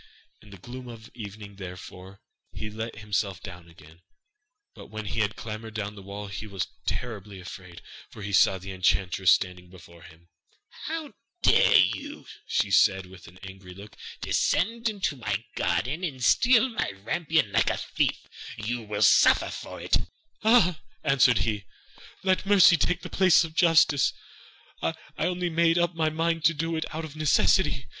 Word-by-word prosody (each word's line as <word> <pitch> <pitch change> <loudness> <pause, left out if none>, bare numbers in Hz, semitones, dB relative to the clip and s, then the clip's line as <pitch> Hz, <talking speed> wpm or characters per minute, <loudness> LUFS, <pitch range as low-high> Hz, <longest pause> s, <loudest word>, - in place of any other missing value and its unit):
In 105 - -17
the 100 - -12
gloom 125 +6 -10
of 115 -2 -11
evening 100 -2 -9
therefore, 95 0 -10 0.3
he 105 0 -6
let 110 +2 -6
himself 100 -2 -2
down 90 -3 -11
again; 80 +1 -18 0.7
but - - -12
when 110 0 -7
he 100 +3 -3
had 105 -1 0
clambered 110 +1 -7
down 105 -1 -3
the 100 - -11
wall 100 +2 -7
he 100 +2 -7
was 95 -3 -4 0.2
terribly 105 -5 -4
afraid, 90 -1 -11 0.3
for 105 - -11
he 100 0 -5
saw 95 0 +4
the 95 +1 -8
enchantress 95 0 +1
standing 90 -1 0
before 85 -2 -15
him. 85 +2 -17 0.6
'How 315 -2 -5 0.3
can - - +6
you 290 +1 -8
dare,' - - -14 0.4
said 95 -1 +4
she 90 - -15
with 95 -2 -14 0.2
angry 95 -1 -11
look, 100 +2 -12 0.3
'descend 230 +6 0
into 195 -9 -3
my 105 -1 -3
garden 155 +8 -1
and 135 -8 -4
steal 245 - +5
my 230 - -2
rampion 160 - 0
like - - +2
a - - -1
thief? - - -1 0.3
You 115 +1 -4
shall 105 0 -1
suffer - - +5
for - - -8
it!' - - +1 0.5
'Ah,' 210 -8 +4 0.2
answered 135 -5 +4
he, 105 -3 -2 0.6
'let 190 0 +1
mercy 195 -3 +7
take 180 +2 0
the - - -7
place 185 -3 +5
of 160 -1 -7
justice, 160 -5 +4 0.7
I - - -1 0.2
only 180 -1 -1
made 165 +1 +3
up 175 0 +1
my 160 -1 0
mind 165 +1 -1
to 165 - +4
do 165 +2 -2
it 160 - -2
out 160 0 -4
of 155 -1 -11
necessity. 155 0 +2
110 Hz, 165 wpm, -26 LUFS, -, 0.7 s, mercy